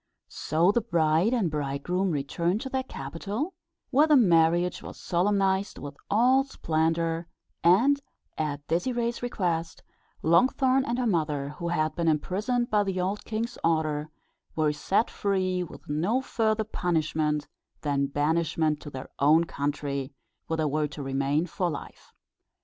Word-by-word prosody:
So 165 +5 +2
the 235 - +1
bride 170 -1 +2
and 220 -10 +1
bridegroom 150 +6 -1
returned 170 +5 -1
to 265 - -5
their 265 0 -1
capital, 205 - -5 0.4
where 290 +4 +5
the 305 - +6
marriage 175 -4 +3
was - - -9
solemnized 195 +2 +1
with 140 0 -7
all 250 +6 +4
splendour, 165 - -1 0.4
and, 240 +12 +5 0.3
at 145 -2 -3
Désirée's 235 - -1
request, 175 -9 -2 0.4
Longthorn 260 - +3
and 240 - -1
her 250 - 0
mother, 150 -8 0
who 170 +4 -6
had 155 -2 0
been 170 -1 -1
imprisoned 205 - 0
by 210 -1 +4
the 190 -2 -2
old 190 +3 -2
king's 230 +2 -3
order, 155 -2 0 0.5
were 155 -2 +2
set 190 +9 0
free, 185 -2 0
with 175 - -9
no 175 - +1
further 220 -4 0
punishment 155 -6 -1 0.3
than 140 -2 0
banishment 155 +1 0
to 145 - -8
their 130 -2 -7
own 155 +4 +5
country, 140 -3 -3 0.3
where 160 - -1
they 155 - +1
were 150 +1 0
to 145 -1 -8
remain 140 +4 0
for 180 +1 -2
life. 145 - -8
170 Hz, 145 wpm, -27 LUFS, 150-210 Hz, 0.5 s, the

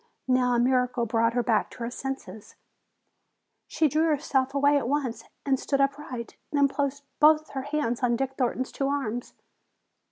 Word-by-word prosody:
Now 250 -1 +3
a - - +2
miracle 250 -1 +2
brought 230 0 +1
her 245 0 +1
back 225 -2 +1
to - - -14
her 235 - -3
senses. 265 -5 -7 1.1
She 315 - +2
drew 310 +3 +2
herself 275 -3 0
away 285 +1 +4
at 275 -5 +1
once 275 -5 -1 0.2
and 270 -2 +2
stood 275 - -1
upright. 275 -4 -2
Then 285 -1 +4
placed 280 0 -2 0.2
both 310 +1 +5
her 270 - -3
hands 285 -4 -2
on 240 -1 +2
Dick 265 +2 -2
Thornton's 255 0 -1
two 275 - -2
arms. 255 -4 -3
265 Hz, 165 wpm, -27 LUFS, 245-285 Hz, 1.1 s, both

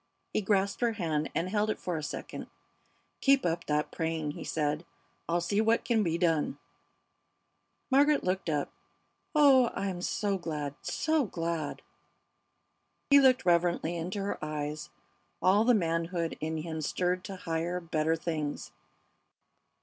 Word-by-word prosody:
He - - +1
grasped 200 +1 +1
her 235 -1 +2
hand 160 -7 -1
and 170 - 0
held 210 +2 0
it - - -2
for 180 - -3
a 155 - -2
second. 145 - -6 0.7
"Keep 275 -4 +4
up 170 0 -1
that 150 0 0
praying," 160 -2 -2
he - - -8
said. 150 0 -1 0.5
"I'll 175 +1 +2
see 200 +5 +1
what 225 +1 +2
can 230 -3 +2
be 170 -4 0
done." 165 -3 +1 1.3
Margaret 285 +2 +4
looked 185 -1 -1
up. 145 -2 -1 0.6
"Oh, 270 -5 +6
I'm 190 -2 -3
so 200 +1 -1
glad, 150 -4 -4
so 315 -3 +1
glad!" 165 -5 -3 1.3
He 280 - +9
looked 260 -6 +4
reverently 175 -1 +2
into 180 +4 -3
her 200 - -3
eyes, 150 - -4 0.5
all 200 +4 +4
the 245 0 +5
manhood 165 -2 -1
in 160 +1 -2
him 160 0 -4
stirred 180 +4 -1
to 195 -2 -6
higher, 170 0 -2
better 160 -1 0
things. 155 - -3
175 Hz, 140 wpm, -30 LUFS, 160-205 Hz, 1.3 s, He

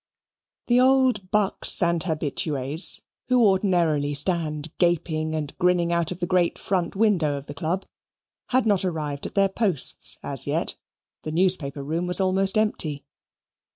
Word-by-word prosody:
The 245 0 +3
old 255 -6 +3
bucks 205 -2 +1
and 170 -1 +1
habitues, 150 -2 -2 0.2
who 250 -2 +4
ordinarily 170 -7 +2
stand 155 -1 -3
gaping 160 -2 0
and 150 -2 -4
grinning 175 -1 +2
out 170 -1 0
of 180 - -6
the - - +1
great 180 -1 +1
front 185 -2 -2
window 185 -9 +2
of 140 - -8
the 145 - -8
Club, 165 +6 -3 0.6
had 255 0 +1
not 200 -4 +3
arrived 150 -6 -3
at - - -14
their 195 -1 +4
posts 190 - +1
as - - -2
yet - - 0 0.5
the 155 - -5
newspaper 160 -5 0
room 165 +5 -2
was 180 +1 +6
almost 190 +1 +1
empty. 155 -9 -1
175 Hz, 150 wpm, -24 LUFS, 155-195 Hz, 0.6 s, was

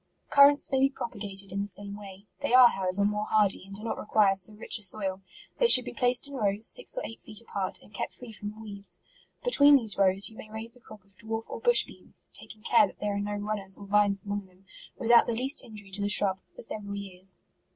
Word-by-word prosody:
Currants 285 +1 +5
may 265 - +2
be 270 +1 +4
propagated 200 -6 -2
in 200 +1 -2
the 200 - -4
same 200 0 -6
way. 200 -1 -12
They 285 -3 +1
are, 255 -1 +9
however, 190 0 -2
more 210 +1 -1
hardy, 205 -3 +1
and 195 - -10
do 210 - -11
not 230 - -4
require 210 -2 +3
so 195 +2 0
rich 215 - -1
a - - -14
soil. 190 -1 +1 0.4
They 485 - +4
should 255 - +8
be - - -7
placed 245 +2 +1
in 280 - -11
rows, 210 -4 0
six - - +2
or - - -3
eight 225 - -10
feet 215 -1 -1
apart, 200 -5 -4
and 205 - -20
kept - - -5
free 245 -2 -11
from 210 0 -8
weeds. 205 -2 -4 0.4
Between 290 -13 +6
these 225 -7 0
rows, 195 0 +3
you 220 - -6
may 215 - -11
raise 225 +2 -5
a - - -16
crop 215 -4 -15
of 200 0 -25
dwarf 225 0 -4
or - - -6
bush 485 0 +4
beans, - - -9
(taking 215 -1 -14
care 225 -3 +4
that - - -16
there 210 -1 -2
are - - -2
no 205 0 -3
runners, 205 -2 -2
or 200 - -11
vines 200 -1 +2
among 205 -1 -5
them) 185 +1 -26 0.3
without 235 0 +4
the 235 - -1
least 265 +5 +4
injury 205 -3 -11
to 200 +2 -1
the 205 - -1
shrub, 195 -2 +2 0.2
for - - -4
several 205 -2 -5
years. 190 -2 -5
210 Hz, 240 wpm, -28 LUFS, 200-230 Hz, 0.4 s, are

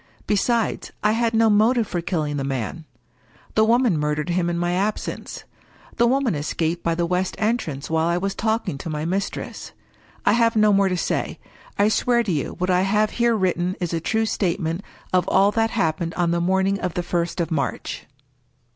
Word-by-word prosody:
Besides, 225 +2 0
I 210 - +4
had 230 0 +1
no 225 0 +5
motive 220 +3 +4
for 175 -3 -3
killing 155 -4 -2
the 135 - -2
man. 135 +4 -3 0.7
The 220 - +4
woman 230 -6 +3
mur 150 0 0
dered 150 +2 -3
him 175 0 +1
in 170 - -1
my 175 0 0
absence. 200 +4 -3 0.5
The 235 - +4
woman 260 -2 +2
escaped 160 +3 -2
by 165 0 +1
the 170 0 0
west 180 +2 -1
entrance 210 - -1
while 160 0 +1
I 170 0 +1
was 195 +2 -1
talking 220 -9 -1
to 165 - -6
my 150 0 -3
mistress. 190 +4 -4 0.5
I 205 - +5
have 230 0 +3
no 215 -1 +5
more 195 -1 +3
to 180 - -1
say. - - -2 0.4
I 205 - +4
swear 235 +2 +2
to 210 - -2
you 150 -5 -2
what 180 +1 0
I 180 0 +3
have 210 +2 +2
here 235 -1 +2
written 185 -2 0
is 175 -2 -2
a 165 - 0
true 220 +6 0
statement 175 -4 -1 0.3
of 180 -1 +2
all 200 +1 +4
that 225 +1 +1
happened 165 -3 -1
on 175 -1 +1
the 170 0 +1
morning 190 +2 +1
of 180 - -3
the 175 - -1
first 175 0 -2
of 170 - -1
March. 140 -6 -3
185 Hz, 200 wpm, -23 LUFS, 170-215 Hz, 0.7 s, no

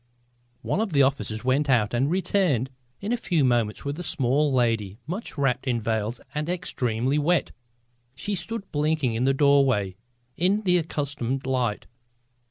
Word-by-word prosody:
One 210 - 0
of 215 -6 -2
the 140 -1 +5
officers 110 -5 -1
went 135 +3 +1
out 115 -5 +3
and 130 +4 +1
returned 175 - +1 0.3
in 205 +3 -3
a 245 - +2
few 175 - +1
moments 120 -3 0
with 140 +3 -3
a - - -3
small 145 -2 +1
lady 115 -6 +1
much 180 +3 -5
wrapped 135 -1 0
in 120 -2 +1
veils 110 +1 -2
and 150 +2 -2
extremely 135 -7 -1
wet. 165 +1 +1 0.6
She 205 +9 -3
stood 205 +1 -4
blinking 150 -4 +1
in 115 +3 0
the 135 - +3
doorway 135 -9 +3 0.4
in 190 +5 +2
the 180 -2 +3
accustomed 140 -5 -3
light. 125 -5 -1
135 Hz, 160 wpm, -25 LUFS, 120-165 Hz, 0.6 s, the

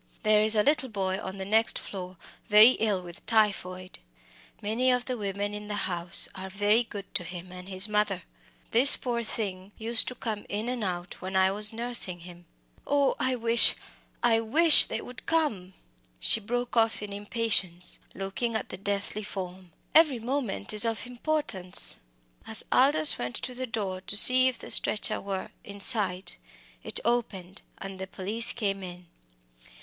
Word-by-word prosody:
There 215 -1 +2
is 215 +1 +4
a 210 - +2
little 270 -1 -1
boy 190 -3 -4
on 190 +1 -9
the 190 - -7
next 220 +3 0
floor 185 -2 -9 0.3
very 215 +2 +6
ill 205 -4 -2
with 175 -1 -14
typhoid. 185 -5 -2 0.6
Many 230 +5 -2
of 250 -1 -1
the 255 - -5
women 205 -1 -5
in 210 0 -9
the 210 - -6
house 175 -1 0
are 190 0 -8
very 205 +4 0
good 205 -4 -11
to - - -2
him 180 +1 -10
and 180 +1 -12
his 190 +2 +1
mother. 210 -4 -2 0.5
This 255 +5 +11
poor 240 -2 -4
thing 200 -3 -5
used 225 +1 +1
to 250 - -6
come 215 -4 -6
in 215 +4 -5
and 250 -3 -5
out 175 -2 -7
when 190 +1 -7
I 190 0 +2
was 210 +2 +5
nursing 230 -6 -2
him 175 0 -14 0.4
Oh, 285 -1 0
I 260 0 -1
wish 230 0 +7 0.5
I 230 -2 +2
wish 305 +9 +7
they - - -6
would 250 +1 -11
come!" 215 - -3 0.4
she - - +1
broke 245 +3 -5
off 225 -2 0
in 205 -1 -8
impatience, 200 -4 -1 0.2
looking 195 +5 -5
at 220 - -5
the - - -9
deathly 200 +2 -5
form 185 -3 -9 0.2
"every 310 -5 +3
moment 235 -4 -4
is 210 - +4
of 230 0 -3
importance!" 245 - -2 0.5
As 220 - 0
Aldous 290 +4 +4
went 120 0 -6
to 255 - -4
the 255 +1 -7
door 195 -5 -6
to 205 - -1
see 255 +4 +6
if 255 - -3
the - - -10
stretcher 210 - +4
was 195 -1 -7
in 200 0 -12
sight, 195 -5 -3 0.5
it - - -2
opened, 205 -6 -4 0.2
and 195 -1 -10
the 190 - -7
police 210 +5 +1
came 200 -4 -4
in. 180 -1 -11
210 Hz, 175 wpm, -25 LUFS, 190-235 Hz, 0.6 s, This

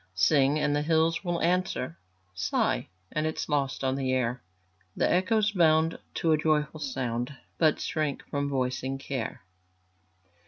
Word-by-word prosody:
Sing, 140 +6 +4
and 150 -1 +1
the 145 - +1
hills 160 +2 +2
will 175 -2 -1
answer; 175 - 0 0.4
Sigh, 90 -8 0 0.2
it 155 - -1
is 155 0 -2
lost 140 -4 -1
on 130 0 +1
the 135 -1 -1
air; 125 -1 0 0.5
The - - +2
echoes 210 +4 +2
bound 160 -3 +3 0.2
to 165 - +1
a 155 - +4
joyful 155 -1 +1
sound, 130 -2 -3 0.2
But 155 -3 +4
shrink 155 -3 -2
from 140 0 -1
voicing 130 0 -1
care. 130 -8 -4
145 Hz, 145 wpm, -28 LUFS, 130-160 Hz, 0.5 s, Sing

